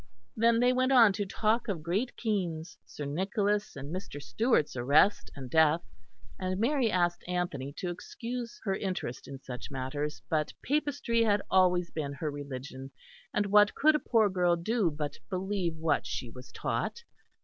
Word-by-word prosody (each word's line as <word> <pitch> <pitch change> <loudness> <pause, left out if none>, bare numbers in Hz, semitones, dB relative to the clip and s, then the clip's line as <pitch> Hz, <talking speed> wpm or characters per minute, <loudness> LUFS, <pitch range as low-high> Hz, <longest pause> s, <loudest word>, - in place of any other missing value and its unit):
Then 230 +1 +4
they 250 +1 +4
went 255 +1 +2
on 230 -6 +7
to 205 0 -2
talk 225 +4 +1
of 180 -7 -3
Great 200 +10 -1
Keynes, 185 -5 -2
Sir 145 - -7
Nicholas, 200 +7 -1
and 140 +3 -6
Mr. 185 -6 -6
Stewart's 220 - +1
arrest 140 +11 +3
and 135 -2 -7
death; 160 +4 +4 0.6
and 185 0 -2
Mary 250 +1 +2
asked 175 -2 +1
Anthony 175 -7 -2
to 175 +3 -4
excuse 235 +6 -6
her 195 - 0
interest 185 - -4
in 135 - -7
such 125 -2 -8
matters, 145 +3 -3
but 155 -2 0
Papistry 285 -4 0
had 205 -2 +2
always 180 -2 +3
been 145 -3 -3
her 150 +2 -3
religion, 135 -2 -7 0.4
and 205 - +1
what 205 +1 +5
could 310 +2 +5
a 300 - +2
poor 225 -6 +3
girl 180 -3 +2
do 200 +2 +1
but 150 -1 -5
believe 185 -2 -1
what 160 -5 0
she 115 +2 -4
was 125 +2 -12
taught? 470 - -3
180 Hz, 165 wpm, -30 LUFS, 150-220 Hz, 0.6 s, on